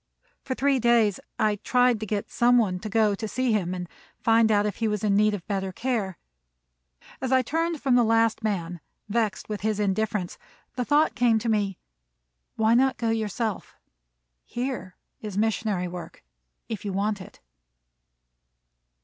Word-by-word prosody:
For 260 - -4
three 275 0 +2
days 235 -4 +3 0.2
I 210 -1 +1
tried 245 +1 +2
to 215 - -5
get 205 0 -3
some 245 +1 +4
one 190 -6 +1
to 215 - -6
go 215 -1 +3
to 220 +2 -4
see 255 +2 0
him 185 -4 0
and 180 -1 -5 0.3
find 225 -1 +4
out 205 -1 +3
if 205 -3 -2
he 225 - 0
was 210 -1 -2
in 205 -2 +2
need 210 0 +3
of 180 - -9
better 195 -2 -2
care. 210 -4 -2 1.0
As 260 -1 -2
I 260 -1 +4
turned 330 +4 -1
from 270 -2 +1
the 245 -1 +5
last 225 0 +2
man, 175 -5 -2 0.3
vexed 215 -2 -1
with 210 -1 -4
his 215 0 -1
indifference, 205 -2 -1 0.4
the 250 - -1
thought 300 +3 +3
came 240 -3 +3
to 230 +1 -2
me: 205 -3 0 0.8
"Why 220 +1 +3
not 260 +2 +3
go 230 -1 0
yourself? 220 -1 -3 0.7
Here 240 -8 -4 0.3
is 210 -3 -6
missionary 215 -4 0
work, 175 - -9 0.4
if 220 -4 -5
you 205 - -3
want 200 +1 -1
it." - - -13
220 Hz, 165 wpm, -26 LUFS, 200-235 Hz, 1.0 s, the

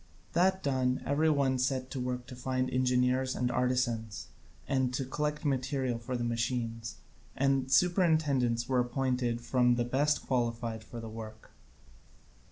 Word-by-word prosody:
That 190 +3 +2
done, 130 -2 0
every 150 +3 +2
one 135 -3 +2
set 130 0 -1
to 135 - -4
work 125 0 -3
to 125 - -10
find 130 +1 -1
engineers 130 +1 +2
and 125 0 0
artisans 120 -3 -1 0.4
and 130 -2 +1
to 135 - -2
collect 150 +3 -2
material 130 -3 0
for 125 +2 -3
the 120 - -2
machines; 115 -1 -2 0.4
and 135 -1 +1
superintendents 145 -8 +3
were 130 -1 +2
appointed 125 -1 0
from 125 0 +3
those 120 0 0
best 145 +4 +1
qualified 115 -3 -1
for 115 +2 -9
the 115 - -7
work. 110 0 -9
125 Hz, 145 wpm, -31 LUFS, 120-135 Hz, 0.4 s, superintendents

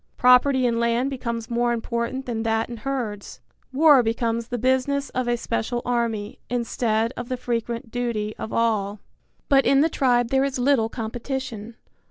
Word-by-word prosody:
Property 250 +1 +5
in 230 -1 +1
land 235 +3 +1
becomes 235 -3 -4
more 240 0 +1
important 235 +3 -3
than 230 -2 -3
that 225 +1 0
in 235 - -6
herds. 230 -5 -4 0.3
War 290 0 +6
becomes 230 0 -1
the 245 - -3
business 260 +3 0
of 255 -1 -2
a 240 0 +1
special 230 - -2
army, 230 -3 -2
instead 230 -1 0
of 245 +1 -6
the 255 - -2
frequent 235 -1 -3
duty 230 -3 -2
of 220 - -5
all. 210 -3 0 0.5
But 275 -1 +4
in 275 0 +5
the 320 - +3
tribe 245 -5 +2
there 265 +1 +2
is 275 -1 -1
little 250 -3 +2
competition. 230 -1 -5
240 Hz, 165 wpm, -24 LUFS, 230-260 Hz, 0.5 s, War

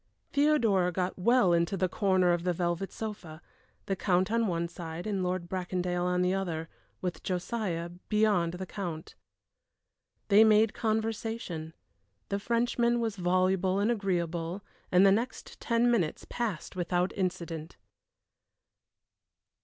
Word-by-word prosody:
Theodora 235 -12 +3
got 180 +1 -2
well 230 -2 +4
into 170 +3 +1
the 185 - +2
corner 185 -2 +2
of 175 - 0
the 180 0 +1
velvet 175 +2 -2
sofa, 205 -8 -7 0.5
the 195 - -1
Count 185 +1 +1
on 230 -1 +2
one 170 -2 -1
side 170 0 -7
and 200 -3 -1
Lord 180 -1 -2
Bracondale 180 -1 -2
on 180 0 +1
the 180 +1 +2
other, 165 -4 -3 0.3
with 180 -3 -3
Josiah 180 -2 -2 0.2
beyond 210 -6 +2
the 185 +1 -5
Count. 175 -5 -6 1.2
They 205 +2 +8
made 215 0 +5
conversation. 220 -7 -2 0.5
The 200 - -1
Frenchman 235 +2 +1
was 225 -3 -1
voluble 185 +1 +2
and 205 +4 +2
agreeable, 175 -3 -2 0.3
and 180 +2 +6
the 195 - +7
next 230 +6 -2
ten 235 0 +2
minutes 180 -10 0
passed 215 -10 -3
without 180 0 0
incident. 170 -4 -3
185 Hz, 130 wpm, -29 LUFS, 175-215 Hz, 1.2 s, They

